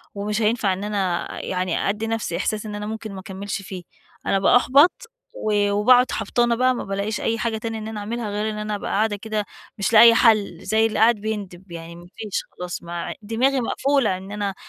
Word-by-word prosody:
ومش 210 +2 -2
هينفع 215 -3 +2
إن 190 - -5
أنا 195 -4 -1 0.2
يعني 185 0 -1
أدِّي 215 +2 -2
نَفْسي 225 -7 -2
إحساس 210 +3 -2
إن 210 -1 -5
أنا 210 0 -5
ممكن 220 -1 -6
ما 190 - -7
أكملش 195 +2 -5
فيه، 185 -2 -8 0.4
أنا 195 - +2
بأحبط 265 - +5 0.4
و 205 -1 +1
وباقعد 245 +5 +5
حبطانة 240 -1 +1
بقى، 255 +1 +3
ما - - -4
بالاقيش 200 +2 -3
أي 230 - 0
حاجة 230 -2 -1
تانية 225 0 -4
إن 215 - -6
أنا 220 -1 -5
أعملها 225 +1 -4
غير 210 +1 -2
إن 215 - -5
أنا 210 0 -3
أبقى - - -5
قاعدة 215 +1 +1
كده 215 0 -3 0.3
مش 200 +3 -1
لاقية 230 +1 +9
حل، 215 -7 +3
زي 220 +1 +3
اللي 220 - -1
قاعد 230 +2 +5
بيندب، 200 -4 -6
يعني 170 0 -8
ما 175 +1 -13
فيش 215 -3 -3
خلاص 180 -1 -6
ما 170 0 -5
دماغي 250 +5 +1
مقفولة 270 -5 +1
إن 190 +2 -10
أنا 205 -2 -3
210 Hz, 205 wpm, -22 LUFS, 195-225 Hz, 0.4 s, لاقية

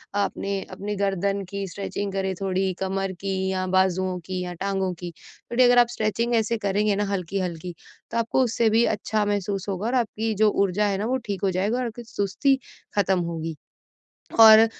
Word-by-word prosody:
आपने 200 -1 -1
अपने 205 +2 -4
गर्दन 195 0 0
की 200 -1 -3
स्ट्रेचिंग 200 +2 -4
करें, 190 -1 -1
थोड़ी 190 -1 0
कमर 195 0 -1
की 195 0 -2 0.2
या 185 -1 -1
बाजुओं 185 0 +2
की 185 0 -3
या 180 - -5
टाँगों 190 0 -1
की। 175 -1 -5 0.4
थोड़ी 245 +2 +4
अगर 245 0 +6
आप 240 - +6
स्ट्रेचिंग 230 +1 0
ऐसे 225 +1 +1
करेंगे 205 0 +1
ना 205 +1 0
हल्की-हल्की, 180 -2 -3 0.4
तो - - -2
आपको 230 +3 +2
उससे 230 -1 +2
भी 225 +2 +4
अच्छा 215 -1 0
महसूस 200 -1 -1
होगा, 195 +3 -2
और 255 - 0
आपकी 225 -2 0
जो 215 +1 +4
ऊर्जा 200 +1 +1
है 195 -1 0
ना, 210 - -2
वो 255 +2 +1
ठीक 200 -3 -3
हो 195 - +3
जाएगा, 200 +6 0
और 255 - -1
आपकी 235 +1 -6
सुस्ती 230 +5 +1 0.4
ख़त्म 190 -2 +2
होगी। 165 -2 -3 0.9
और 220 0 +10
200 Hz, 185 wpm, -25 LUFS, 190-220 Hz, 0.9 s, और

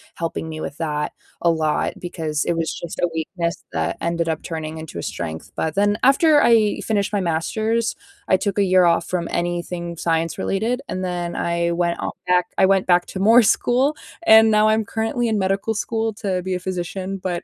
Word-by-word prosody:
helping 165 -1 -4
me 155 - -6
with 145 - -5
that 150 -2 -2 0.3
a 170 - +3
lot, 155 -2 0
because 160 -4 -3
it 170 - 0
was 165 -1 -1
just 170 - -6
a 175 - +2
weakness 170 +1 -3
that 80 -1 -1
ended 170 0 -1
up 160 -1 -1
turning 160 -1 -5
into 160 - -7
a - - -5
strength, 80 0 -5
but 160 -1 -2
then 205 +1 +2
after 295 +2 +5
I 220 -3 +3
finished 210 -1 0
my 200 - +1
Master's, 220 +8 -1 0.3
I 190 - +4
took 200 0 -2
a 200 - +4
year 185 -1 +4
off 170 0 +3
from 175 -2 -2
anything 175 0 -3
science 165 0 -1
related, 230 +6 -1
and 185 0 -3
then 175 -1 -3
I 170 0 0
went 170 0 0
out - - -4
back 180 0 +3
I 190 - +5
went 195 0 +3
back 175 -1 +4
to - - -2
more 230 +4 +7
school, 255 +7 +2 0.3
and 220 -4 +7
now 215 0 +4
I'm 220 +1 +2
currently 225 +2 -1
in 215 -2 +1
medical 195 +3 0
school 225 +1 -1
to 195 -4 -2
be 190 0 -2
a - - -3
physician. 185 +1 -4
But, 180 -2 -2
180 Hz, 205 wpm, -21 LUFS, 170-210 Hz, 0.3 s, more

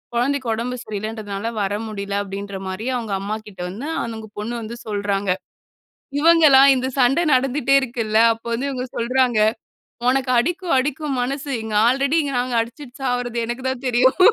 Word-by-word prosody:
கொழந்தைக்கு 260 +1 0
உடம்பு 240 +3 -3
சரியில்லன்றதுனால 215 0 -4
வர 200 0 -1
முடியல." 200 -1 -3
அப்டின்ற 200 0 -6
மாரி 195 +6 -4
அவங்க 225 -4 -4
அம்மாகிட்ட 210 -2 -6
வந்து 230 +11 -6 0.2
அந்த 220 -2 -6
பொண்ணு 225 +3 -4
வந்து 225 +1 -6
சொல்றாங்க. 200 -1 -1 0.9
இவங்களா 315 -4 +7 0.2
இந்த 255 - -1
சண்ட 265 +5 +4
நடந்துட்டே 270 +1 +2
இருக்கில்ல, 230 -4 -1
அப்போ 225 +1 -10
வந்து 265 +4 -2
இவுங்க 255 -2 -3
சொல்றாங்க. 245 0 +2 0.7
"உனக்கு 260 0 +1
அடிக்கும் 350 +7 0
அடிக்கும் 290 +1 -1
மனசு. 275 +3 -3
இங்க 220 -1 -5
ஆல்ரெடி 275 +5 +2 0.2
நாங்க 250 0 -1
அடிச்சிட்டு 245 +3 -7
சாவுரது 245 -2 -1
எனக்கு 240 +2 -5
தான் 260 0 -5
தெரியும்." 250 +3 +3
240 Hz, 145 wpm, -21 LUFS, 215-265 Hz, 0.9 s, இவங்களா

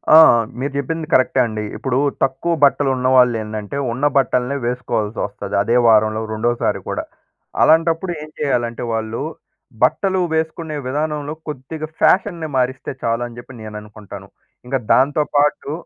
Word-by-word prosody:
ఆ! - - +11 0.4
మీరు 140 +1 -2
జెప్పింది 155 +3 -3
కరెక్టే 130 0 +3
అండి. 110 -2 -4
ఇప్పుడు 130 -2 -1 0.3
తక్కువ 135 +6 0
బట్టలున్న 135 -2 +3
వాళ్ళు 125 -2 +5
ఏందంటే 105 +4 -5
ఉన్న 130 +5 -1
బట్టలనే 130 0 +1
వేసుకోవాల్సి 115 -3 -2
ఒస్తది 100 0 -6
అదే 115 - +1
వారంలో 110 0 +4
రెండోసారి 120 +2 0
కూడా. - - -2 0.6
అలాంటప్పుడు 165 +3 +3
ఏం 155 - -9
చేయాలంటే 120 -5 -1
వాళ్ళు, 110 +2 -3 0.6
బట్టలు 190 +7 +2
వేసుకునే 160 0 -2
విధానంలో 150 +1 -2
కొద్దిగా 150 +2 -6
ఫ్యాషన్‌ని 170 -4 +2
మారిస్తే 130 +1 -1
చాలు 115 +1 0
అని 120 0 -13
జెప్పి 125 +1 -12
నేననుకుంటాను. 105 -1 -10 0.4
ఇంక 130 - -2 0.2
దాంతో 145 +3 +3
పాటు 145 0 +1
130 Hz, 130 wpm, -19 LUFS, 115-150 Hz, 0.6 s, ఆ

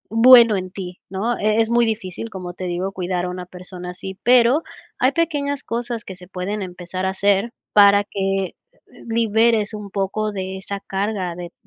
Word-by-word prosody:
bueno 235 -2 +8
en 185 0 -4
ti, 185 -2 -7
¿no?, 215 +5 -1
e 215 +1 +2
es 225 0 +2
muy 235 0 +4
difícil, 215 0 -4
como 180 -4 -7
te 185 - -6
digo, 180 +2 -2
cuidar 180 -1 -2
a - - -3
una 180 0 -6
persona 180 0 -7
así, 190 +1 -8
pero, 245 +4 +5 0.4
hay 255 - +4
pequeñas 285 -3 -1
cosas 235 0 -3
que 190 - -8
se 180 0 -13
pueden 195 +3 -4
empezar 180 0 -5
a - - +1
hacer 200 +3 +1 0.2
para 205 0 +7
que, 195 -2 -2 0.5
liberes 225 -1 +2
un 210 -1 -7
poco 205 +2 -1
de 190 -1 -4
esa 200 +1 -5
carga 195 -3 -2
de 175 0 -7
200 Hz, 180 wpm, -21 LUFS, 185-225 Hz, 0.5 s, bueno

